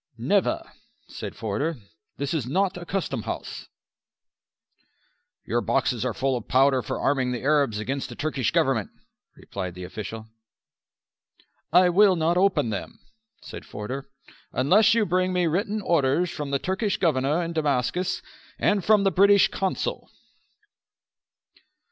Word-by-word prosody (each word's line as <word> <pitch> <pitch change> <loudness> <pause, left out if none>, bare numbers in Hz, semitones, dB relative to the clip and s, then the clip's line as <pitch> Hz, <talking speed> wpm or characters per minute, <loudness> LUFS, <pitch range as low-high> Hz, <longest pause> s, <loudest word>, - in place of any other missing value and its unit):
"Never," - - +1 0.5
said - - -7
Forder. 115 +9 -2 0.4
"This 140 +2 -2
is 145 -7 -2
not 190 +7 0
a 175 -1 -8
custom 195 -4 -2
house." - - -6 1.8
"Your - - 0
boxes - - 0
are - - -2
full 135 -1 0
of 120 - -6
powder 135 0 +3
for 105 - -4
arming 130 -3 +1
the 125 - -5
Arabs 140 -6 +2
against 130 +6 -3
the - - -8
Turkish 140 -6 -1
Government," - - +1 0.5
replied 90 -3 -6
the 90 - -8
official. 110 +4 -7 1.5
"I 180 +2 +6
will 190 +1 +5
not 165 +1 +1
open 180 - +2
them," 100 - -5 0.5
said - - -9
Forder, 130 +7 -6 0.4
"unless 200 - +4
you 225 -2 +3
bring 185 +1 +1
me 180 -1 +2
written 200 +6 -1
orders 165 +1 +2
from 150 -4 -5
the 140 - +1
Turkish 190 - -1
Governor 155 0 +1
in 170 0 -4
Damascus 155 +3 -1 0.3
and 200 -2 +1
from 210 0 +4
the 195 - +3
British 200 +3 +5
Consul." 190 -1 -3
155 Hz, 135 wpm, -25 LUFS, 130-185 Hz, 1.8 s, I